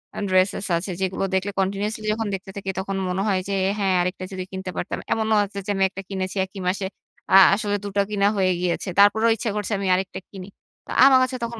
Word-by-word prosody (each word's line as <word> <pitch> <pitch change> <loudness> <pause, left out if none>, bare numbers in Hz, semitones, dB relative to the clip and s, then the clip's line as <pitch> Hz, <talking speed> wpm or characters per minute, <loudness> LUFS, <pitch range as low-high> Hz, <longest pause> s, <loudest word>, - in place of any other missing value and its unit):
আ - - -4
dresses 185 +1 +2
আছে 185 +3 -4
যেগুলো 190 0 -1
দেখলে 190 +2 0
কন্টিনিউয়াসলি 205 +3 -2
যখন 225 0 -3
দেখতে 195 0 -5
থাকি 195 -1 -5
তখন 195 0 -3
মনে 185 +2 -1
হয় 190 -2 +2
যে, - - -1 0.3
হ্যাঁ, 195 -2 +2
আরেকটা 180 +1 -3
যদি 185 -1 -4
কিনতে 190 0 -5
পারতাম। - - -3 0.2
এমনও 220 -1 +1
আছে 200 0 -6
যে, 205 - -1
আমি 195 - +1
একটা 195 0 -7
কিনেছি 190 0 -4
একই 190 +1 -11
মাসে। 190 +1 -1 0.5
আ - - +6 0.2
আসলে 205 -1 -1
২ - - -4
টা - - +5
কিনা 200 -1 +2
হয়ে 185 -1 +2
গিয়েছে। 180 +1 -2
তারপরেও 220 +3 +5
ইচ্ছা 225 0 -3
করছে 210 +1 -3
আমি 195 - -2
আরেকটা 185 0 -3
কিনি। 190 -2 -9 0.4
তা - - -10
আমার 265 -1 +7
কাছে 255 0 -2
তখন 235 -1 -4
195 Hz, 225 wpm, -23 LUFS, 190-205 Hz, 0.5 s, আমার